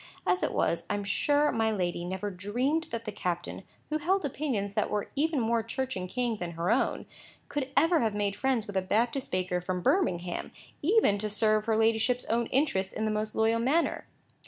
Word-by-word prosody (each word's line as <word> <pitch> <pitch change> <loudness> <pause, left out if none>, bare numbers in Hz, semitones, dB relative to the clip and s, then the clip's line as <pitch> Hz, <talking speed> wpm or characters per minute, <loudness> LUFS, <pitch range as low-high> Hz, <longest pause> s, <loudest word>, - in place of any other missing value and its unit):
As 180 0 +2
it - - 0
was, 170 0 0
I - - +1
am 205 - -3
sure 290 +9 +2
my 225 0 +1
lady 175 -5 -1
never 190 +3 -3
dreamed 245 - -1
that 230 0 -6
the 215 - -3
captain, 180 -3 -3 0.3
who 310 - +1
held 365 +3 +1
opinions 250 -8 -2
that - - 0
were 210 -1 -2
even 305 +1 +1
more 230 0 +1
Church 260 +4 -3
and 185 -1 -4
King 240 -1 -1
than 175 -3 -5
her 170 +4 0
own, 240 - +1 0.4
could 275 -2 -2
ever 330 0 +5
have 220 -3 0
made 205 -1 0
friends 260 -4 0
with 205 - -8
a 190 - +3
Baptist 230 +7 0
baker 180 -1 0
from 180 0 -3
Birmingham, 180 - 0 0.3
even 330 - +3
to 215 +1 -2
serve 215 +1 +2
her 220 -1 +2
ladyship's 225 +3 +2
own 230 +1 0
interests 250 -9 0
in 220 - -2
the 215 - +1
most 215 0 -2
loyal 225 +1 +2
manner. 285 +8 +1
220 Hz, 205 wpm, -29 LUFS, 195-260 Hz, 0.4 s, ever